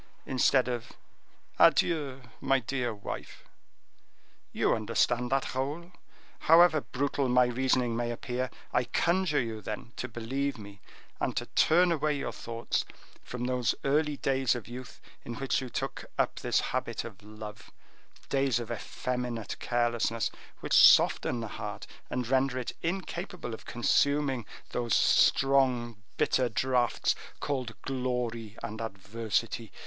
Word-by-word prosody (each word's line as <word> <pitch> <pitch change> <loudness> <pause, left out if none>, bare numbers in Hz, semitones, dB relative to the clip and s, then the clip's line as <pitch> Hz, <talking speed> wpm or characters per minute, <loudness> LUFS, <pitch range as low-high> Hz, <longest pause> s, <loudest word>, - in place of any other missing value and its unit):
instead 130 0 +3
of 120 -2 -4 0.7
'Adieu, 140 -6 +3 0.2
my 135 0 +3
dear 125 0 -2
wife.' 100 -2 -7 1.1
You - - +2
understand 120 +3 +1
that, 135 0 0
Raoul. 145 +7 -3 0.5
However 165 -1 +6
brutal 140 0 -1
my 125 0 +5
reasoning 125 -1 +1
may 120 0 -1
appear, 125 +1 -3 0.2
I - - +2
conjure 170 +3 +1
you, 115 -3 -3
then, 110 +3 -6
to 125 - -3
believe 130 +4 -2
me, 100 -2 -11 0.4
and - - -1
to - - 0
turn 175 +2 +4
away 155 -2 +1
your - - -3
thoughts 115 0 -2 0.4
from 125 0 -5
those 125 -2 +1
early 150 +1 +1
days 135 -3 +1
of 120 - -6
youth 125 +1 -9 0.2
in 120 - -6
which 135 +2 0
you 130 - -6
took - - -4
up - - 0
this - - +1
habit - - -2
of 110 -3 -10
love—days 110 +5 -4
of 120 -1 -5
effeminate 120 -1 -3
carelessness, 120 -2 0 0.3
which - - -3
soften 120 - +6
the 115 - -4
heart - - -5 0.2
and 125 -2 -2
render 130 0 +2
it 125 - -3
incapable 175 - -4
of 110 - -9
consuming 135 0 +1 0.2
those 120 -3 0
strong 125 -5 +3 0.2
bitter 125 -2 +2
draughts 120 +1 +1 0.3
called 130 -5 -3
glory 125 -4 -3
and 110 +1 -5
adversity. 110 +1 -3
125 Hz, 130 wpm, -29 LUFS, 115-135 Hz, 1.1 s, However